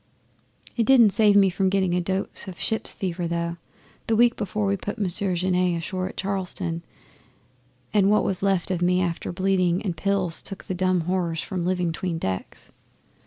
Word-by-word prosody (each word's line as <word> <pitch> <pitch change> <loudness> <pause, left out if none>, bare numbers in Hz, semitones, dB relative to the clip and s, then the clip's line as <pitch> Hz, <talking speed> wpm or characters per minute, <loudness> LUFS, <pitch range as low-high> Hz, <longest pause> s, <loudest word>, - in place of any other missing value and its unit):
'It 235 - +3
didn't 235 -4 +6
save 210 0 +4
me 200 -1 +6
from 190 +1 +1
getting 190 -2 +1
a 180 - +1
dose 190 +2 -3
of 185 -2 -8
ship's 220 - 0
fever 180 -2 -3
though, 170 0 -2 0.5
the 225 - +2
week 240 +1 +4
before 210 0 -2
we 200 0 +1
put 205 +3 -5
Monsieur 195 -1 +1
Genet 180 0 +1
ashore 185 +2 -3
at - - -13
Charleston; 185 -3 -3 1.1
and 200 -2 +4
what 210 - +3
was 190 - -2
left 195 -2 +1
of 180 -2 -1
me 180 +1 +3
after 170 -2 -3
bleeding 185 -1 +1
and 185 -5 -2
pills 185 -1 0
took 195 - -4
the - - -4
dumb 185 -1 +1
horrors 170 -2 -1
from 180 -3 -3
living 180 -2 0
'tween 170 0 -3
decks. 95 -10 -5
185 Hz, 180 wpm, -24 LUFS, 175-195 Hz, 1.1 s, didn't